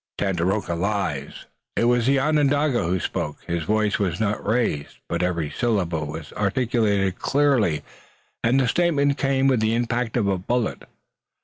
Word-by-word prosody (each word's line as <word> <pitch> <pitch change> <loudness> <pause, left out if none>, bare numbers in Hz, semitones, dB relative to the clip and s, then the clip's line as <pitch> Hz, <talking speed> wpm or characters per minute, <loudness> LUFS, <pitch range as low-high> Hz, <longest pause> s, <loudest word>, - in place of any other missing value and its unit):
"Tandakora 95 -1 0
lies!" 90 -6 -2 0.3
It - - +1
was 120 0 +3
the 135 +1 +4
Onondaga 145 - +2
who 90 +2 0
spoke. 75 -3 -3
His 85 -1 -2
voice 105 +5 +1
was 95 -3 -1
not 105 -1 -1
raised, 105 -11 -1
but - - -2
every 85 -4 -1
syllable 90 -10 -1
was 75 0 -8
articulated 105 -3 0
clearly, 135 - +2 0.6
and 125 +4 +3
the 130 - +2
statement 145 -1 +2
came 135 -1 +1
with 130 -3 +3
the 110 +1 +1
impact 120 0 -1
of 105 -4 +1
a 95 -2 +1
bullet. 120 +5 -2
110 Hz, 150 wpm, -23 LUFS, 90-125 Hz, 0.6 s, the